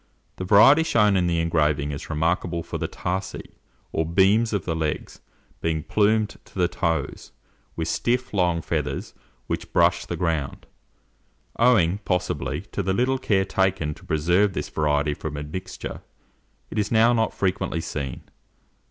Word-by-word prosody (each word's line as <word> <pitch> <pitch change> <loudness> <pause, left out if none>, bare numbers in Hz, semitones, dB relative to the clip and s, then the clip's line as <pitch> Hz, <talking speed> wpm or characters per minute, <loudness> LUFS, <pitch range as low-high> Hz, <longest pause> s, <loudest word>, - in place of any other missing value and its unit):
The 95 - -4
variety 110 - +7
shown 105 -10 +3
in 90 -2 +2
the 85 -1 +1
engraving 75 -3 +1
is 70 +2 -7
remarkable 85 +2 0
for - - -5
the - - -2
tarsi, 95 +2 -4 0.4
or 80 - 0
beams 95 +7 +3
of 100 -4 -2
the 80 - -1
legs, 80 -2 -3 0.4
being 80 -2 -1
plumed 105 +2 +1
to - - -22
the 90 -1 +3
toes, 85 -1 -2 0.4
with - - -2
stiff, 125 0 -1
long 90 -4 +1
feathers, 75 -4 -3 0.3
which - - -4
brush - - +3
the - - -3
ground. 80 -6 -2 0.9
Owing, 105 -7 +4
possibly, 90 -7 -2
to - - -2
the 95 0 0
little 130 +5 +1
care 95 -6 +1
taken 95 -6 0
to - - -17
preserve 90 +6 +2
this - - -4
variety 75 -1 +1
from 75 0 -6
admixture, 75 +6 -6 0.7
it 110 - -2
is 105 0 -1
now 115 +1 +5
not 115 -1 +1
frequently 95 -3 -1
seen. 70 -5 -5
90 Hz, 150 wpm, -24 LUFS, 80-105 Hz, 0.9 s, variety